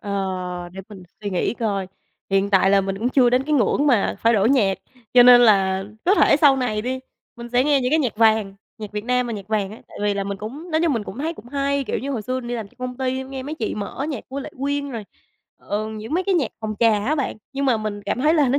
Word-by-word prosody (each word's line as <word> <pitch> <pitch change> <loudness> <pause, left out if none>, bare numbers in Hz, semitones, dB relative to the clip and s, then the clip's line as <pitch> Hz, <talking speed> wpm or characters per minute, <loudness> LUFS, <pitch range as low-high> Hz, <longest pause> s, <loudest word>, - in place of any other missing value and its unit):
Ờ, 185 -3 -3
để 190 - -7
mình 200 -4 -11 0.2
suy 205 - -3
nghĩ 185 +5 -1
coi, 200 -5 -2 0.4
hiện 195 +1 +2
tại 195 -1 +4
là 200 0 +5
mình 195 0 -3
cũng 235 - 0
chưa 255 -2 +4
đến 250 +1 +3
cái 305 - -2
ngưỡng 285 +2 +2
mà 240 -8 +2
phải 230 - +4
đổi 215 +1 +3
nhạc. 205 -8 +2 0.4
Cho 245 - +9
nên 245 0 +9
là, 195 -4 +4 0.2
có 375 - +4
thể - - +5
sau 285 -2 +5
này 230 -5 -1
đi, 260 +2 -3 0.4
mình 235 0 -8
sẽ 245 +2 +2
nghe 285 -2 +3
những 250 +1 0
cái 315 - +3
nhạc 255 -8 -1
vàng, 220 -3 +3 0.2
nhạc 210 -2 -8
Việt 210 0 -4
Nam 250 0 +1
mà 235 - -4
nhạc 200 -2 -7
vàng 210 -3 0
á. 215 - -12
Tại - - -12
vì 205 -1 +1
là 200 0 -2
mình 200 0 -4
cũng 280 +12 -8
nói 315 0 +1
chung, 330 - +2
mình 225 -5 -2
cũng 230 - -8
thấy 320 +4 -2
cũng 240 - -13
hay, 280 +1 -1
kiểu, - - -2
như 275 - -4
hồi 235 -6 -3
xưa 255 +4 -2
mình 240 - -8
đi 245 - -2
làm 225 -4 -5
cho - - -27
công 250 0 -5
ty 260 0 -2
nghe 265 0 -6
mấy 290 +4 -5
chị 235 - -3
mở 210 +7 -4
nhạc 275 -8 -5
của 275 +2 -5
Lệ - - -7
Quyên, 285 0 -1
rồi, 225 -4 -6 0.5
ờ, 215 +1 -3
những 220 +5 -6
mấy 365 - +1
cái 390 - +1
nhạc 295 -10 0
phòng 215 -1 -3
trà 215 -3 +3
á 295 - +1
bạn. 280 -4 -2 0.2
Nhưng 275 0 -2
mà 255 -4 +3
mình 215 -1 -4
cảm 205 +5 -2
thấy 305 +4 +3
là 295 -5 +3
nó 270 +3 +2
235 Hz, 285 wpm, -22 LUFS, 205-270 Hz, 0.5 s, Cho